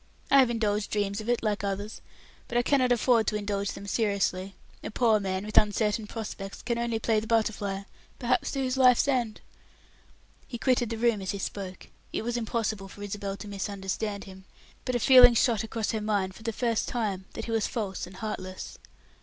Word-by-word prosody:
"I 275 - +8
have 260 -3 +5
indulged 215 -3 0
dreams 205 0 -1
of 215 - -6
it, 240 -1 +1
like 210 -2 0
others, 205 +2 -3 0.5
but 240 - -1
I 240 - +3
cannot 255 -2 +3
afford 235 -2 +3
to - - +1
indulge 205 -1 -2
them 200 - -9
seriously; 200 -3 0 0.3
a - - -4
poor 220 -1 +3
man, 190 0 -2
with 215 - +6
uncertain 210 +1 0
prospects 205 -3 -6
can 235 0 -1
only 235 -1 0
play 220 0 +1
the 220 - -7
butterfly, 205 -3 0 0.3
perhaps 250 +1 +1
to 275 -1 -1
his 255 0 -1
life's 255 0 +5
end." 245 -6 0 1.1
He 240 - -5
quitted 245 -1 +2
the 230 - -3
room 230 -3 +2
as 190 - -5
he 200 - -1
spoke. 190 -1 -5 0.3
It - - -2
was 240 +1 -2
impossible 220 -3 -2
for 205 +1 -10
Isabel 200 -1 -4
to 200 - -9
misunderstand 200 +1 -3
him, 190 -1 -12 0.4
but 255 - -1
a - - +2
feeling 250 0 +8
shot 225 -2 +3
across 220 -1 -2
her 220 - -2
mind, 200 -3 0
for 220 - -14
the 230 +1 -2
first 230 0 0
time, 205 -6 -2
that 225 - -5
he 230 - -5
was 225 -2 +1
false 200 -7 -3
and 185 - -12
heartless. 185 -2 -6
215 Hz, 200 wpm, -28 LUFS, 200-235 Hz, 1.1 s, I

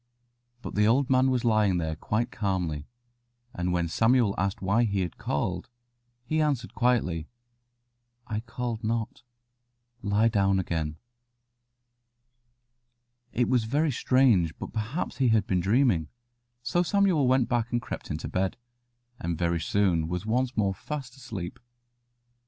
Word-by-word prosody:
But - - -6
the 105 +1 +3
old 130 +4 +3
man 130 0 +4
was 125 -2 0
lying 105 -5 +3
there 80 -2 -2
quite 110 +8 -1
calmly, 90 -7 -2 0.7
and 90 0 -1
when 85 -1 +1
Samuel 115 +3 +3
asked 100 +1 -1
why 100 +5 +2
he 100 -4 0
had 90 -3 -4
called, 90 +6 -2 0.6
he 155 +5 +1
answered 140 -6 -1
quietly, 110 -11 +1 1.0
"I 110 -3 -3
called 115 0 -4
not; 115 +1 -2 0.8
lie 105 +2 +2
down 100 -3 +2
again." 80 -4 -2 2.3
It 120 0 +1
was 125 -4 +2
very 145 +6 +1
strange; 115 - +3
but - - -7
perhaps 115 +9 -3
he 130 - +3
had 110 -4 +3
been 95 -2 +1
dreaming, 100 - +2 0.6
so 175 +8 +1
Samuel 180 -6 +3
went 130 -1 +3
back 120 -1 0
and 120 - +1
crept 115 - -7
into 75 +2 -4
bed, 95 +3 -1 0.6
and 85 -9 -2
very 85 0 0
soon 85 -3 +1
was 90 +3 -3
once 125 +3 0
more 100 -2 +2
fast 135 +3 -6
asleep. 115 -5 -7
110 Hz, 140 wpm, -27 LUFS, 90-125 Hz, 2.3 s, man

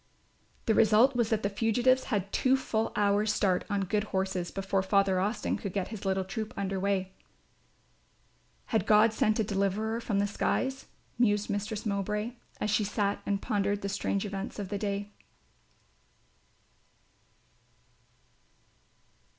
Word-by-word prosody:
The 220 - +3
result 225 +5 +5
was 235 -2 +1
that 220 -1 0
the - - +2
fugitives 240 +5 +2
had 200 -4 -2
two 265 +1 +3
full 225 -4 -1
hours 205 0 +2
start 190 -4 +1
on 200 -1 0
good 205 +2 0
horses, 190 -3 -2
before 195 0 -1
Father 195 -1 +2
Austin 205 +5 -1
could 200 -4 -5
get 195 -2 -2
his 210 -2 -7
little 190 0 +1
troop 210 +3 -5
under 195 -1 -2
way. 190 -1 0 1.6
"Had 220 - +2
God 215 +1 +5
sent 215 0 +1
a - - +3
deliverer 205 +3 -1
from 215 -3 -1
the 200 - +2
skies?" 265 +6 -1 0.3
mused 210 -3 +2
Mistress 205 +2 -3
Mowbray, 210 +2 -1 0.3
as 210 - -1
she 210 0 +2
sat 205 0 -1
and 200 -1 -1
pondered 205 -1 0
the 200 - -2
strange 200 0 -1
events 195 0 -5
of 200 -3 -5
the 200 0 -3
day. 205 0 -3
205 Hz, 140 wpm, -29 LUFS, 195-220 Hz, 1.6 s, result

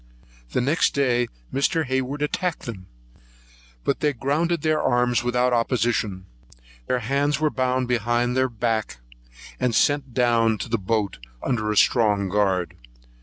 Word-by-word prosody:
Next 145 +7 +2
day 125 -3 +2 0.3
Mr. 160 +4 +1
Hayward 130 +2 -2
attacked 175 +3 -2
them, 95 -6 -8 1.0
but 140 - 0
they 150 -1 +1
grounded 150 +6 -1
their 155 -1 +2
arms 125 -1 +2
without 125 +1 +1
opposition; 115 -5 0 0.6
their 125 -1 0
hands 140 +5 0
were 155 -1 +1
bound 130 -1 0
behind 120 +1 0
their 130 0 +2
back 115 - -2 0.6
and 125 -3 0
sent 145 0 +2
down 115 -3 +3
to 115 - -6
the 115 -1 0
boat 100 - -1 0.2
under 110 -5 -1
a 105 - -1
strong 105 -5 +3
guard. 95 -3 0
125 Hz, 135 wpm, -23 LUFS, 115-140 Hz, 1.0 s, down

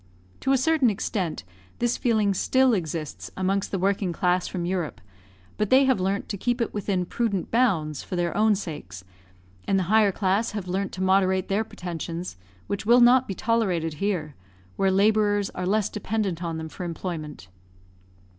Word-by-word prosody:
To 270 - 0
a 270 - +5
certain 290 -1 +3
extent, 190 -4 -2 0.3
this 240 0 +1
feeling 215 -4 +2
still 260 +6 +3
exists 160 -5 -3
amongst 195 +1 0
the 195 - -2
working 195 0 0
class 180 +1 +1
from 175 -2 -4
Europe, 175 -3 -2 0.6
but 210 -1 0
they 265 +1 +6
have 260 -5 +2
learnt 195 +2 -1
to 200 - -4
keep 245 +3 0
it 230 - -1
within 195 -3 -1
prudent 200 -2 -2
bounds 165 - +1
for - - -6
their 175 -1 -1
own 215 0 +4
sakes; 145 - -7 0.6
and 195 - +2
the 190 - +1
higher 215 -2 +5
class 200 +4 0
have 205 -3 -4
learnt 190 +2 -2
to 185 - -3
moderate 190 0 +2
their 200 +3 +1
pretensions, 170 - -6 0.3
which 200 - -3
will 235 +3 +5
not 250 +2 +6
be 195 - -4
tolerated 185 -9 0
here, 175 -7 -1 0.4
where 195 - +2
labourers 205 +1 +2
are 180 0 -4
less 210 +1 +2
dependent 200 -4 -2
on 165 -1 -3
them 160 0 -5
for 170 - -8
employment. 165 - -5
195 Hz, 175 wpm, -25 LUFS, 180-215 Hz, 0.6 s, they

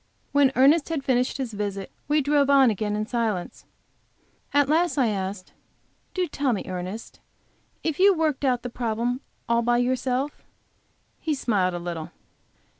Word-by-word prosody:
When 280 -2 +4
Ernest 285 +5 +5
had 315 -4 -2
finished 255 -1 +1
his 255 -5 -4
visit 200 -2 -4 0.2
we 300 +1 +3
drove 285 0 +2
on 270 -4 +6
again 210 0 -2
in 210 0 -1
silence. 220 -6 -2 0.9
At 285 -1 +3
last, 330 +2 +2
I 250 -5 +3
asked: 190 -2 -4 0.6
"Do 370 -1 +1
tell 285 -5 -1
me, 200 - -2
Ernest, 185 +4 -6 0.6
if 320 -1 -2
you 390 0 +6
worked 310 -4 0
out 250 -3 +1
this 245 - -5
problem 240 +2 -1 0.3
all 235 0 +3
by 240 +1 +2
yourself?" 255 +3 -1 0.8
He 315 -2 -1
smiled 195 -9 0
a - - -2
little. 170 -2 -5
250 Hz, 155 wpm, -25 LUFS, 210-285 Hz, 0.9 s, on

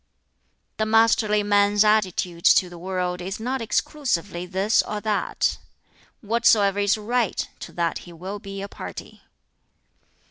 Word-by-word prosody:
"The 215 - 0
masterly 220 -1 +3
man's 205 0 +3
attitude 185 -5 +1
to 180 - +5
the 175 - -10
world 180 0 -3
is 190 +4 -5
not 255 +3 -2
exclusively 205 - -2
this 195 +4 +2
or 210 - -5
that: 215 -1 -1 0.6
whatsoever 210 -3 +3
is 205 +1 +2
right, 230 0 -1
to - - -8
that 170 -1 -1
he 175 - -13
will 185 +5 -7
be 195 0 -7
a - - -5
party. - - -9
205 Hz, 135 wpm, -23 LUFS, 185-220 Hz, 0.6 s, to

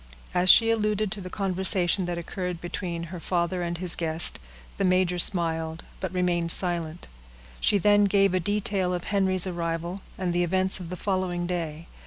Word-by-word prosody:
As 180 +1 +2
she 225 +3 +8
alluded 215 -2 0
to 205 -1 -4
the 185 - -8
conversation 190 -1 +1
that 175 -1 -4
occurred 180 0 -5
between 175 -1 -5
her 180 - -6
father 175 +1 -1
and 170 0 -3
his 175 -1 +2
guest, 160 0 0 0.4
the - - -1
major 185 -1 +1
smiled 165 -2 +1 0.2
but 190 - -4
remained 175 -2 +1
silent. 170 -2 +2 0.5
She 205 - +2
then 205 +1 +4
gave 195 -1 +2
a 185 - +2
detail 195 -1 -1
of 175 - -5
Henry's 190 -3 +1
arrival, 170 +1 -4 0.2
and 180 -2 -2
the 175 0 +1
events 190 +2 0
of 175 -2 -8
the 180 - -6
following 185 -3 -2
day. 165 -3 -4
180 Hz, 175 wpm, -25 LUFS, 170-190 Hz, 0.5 s, she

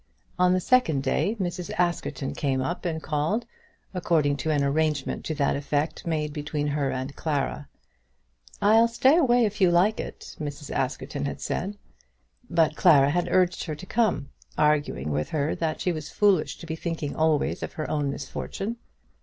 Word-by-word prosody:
On 180 0 +5
the 185 - +2
second 165 - +2
day 200 +11 0
Mrs. 175 -1 -3
Askerton 175 -5 -1
came 135 -2 -1
up 150 +9 -3
and 160 -2 -2
called, 160 +10 0 0.5
according 160 -5 +2
to 160 - -3
an 145 -2 +2
arrangement 150 0 0
to 155 - -2
that 140 -2 +1
effect 145 +3 -2
made 150 -2 -1
between 150 0 -3
her 145 -1 0
and 130 +2 -4
Clara. 145 -1 -2 0.9
"I'll 220 +3 +6
stay 260 +5 +4
away 245 -8 +4
if 210 -1 -3
you 185 - +6
like 180 +5 +3
it," - - -7
Mrs. 145 -1 -6
Askerton 135 +2 -2
had 140 - -4
said. 200 +3 -3 0.7
But 160 -2 +2
Clara 145 -6 +5
had 175 +2 0
urged 180 -1 +2
her 155 -3 -4
to 180 - -10
come, 215 -9 0 0.3
arguing 145 - +1
with 75 +1 -1
her 150 0 0
that 160 -2 -1
she 180 - +1
was 155 -3 -5
foolish 200 -6 +2
to - - -10
be 160 -1 -4
thinking 165 -3 -4
always 155 -2 +1
of - - -5
her 155 - -4
own 145 -2 0
misfortune. 195 +10 -5
155 Hz, 170 wpm, -26 LUFS, 145-180 Hz, 0.9 s, I'll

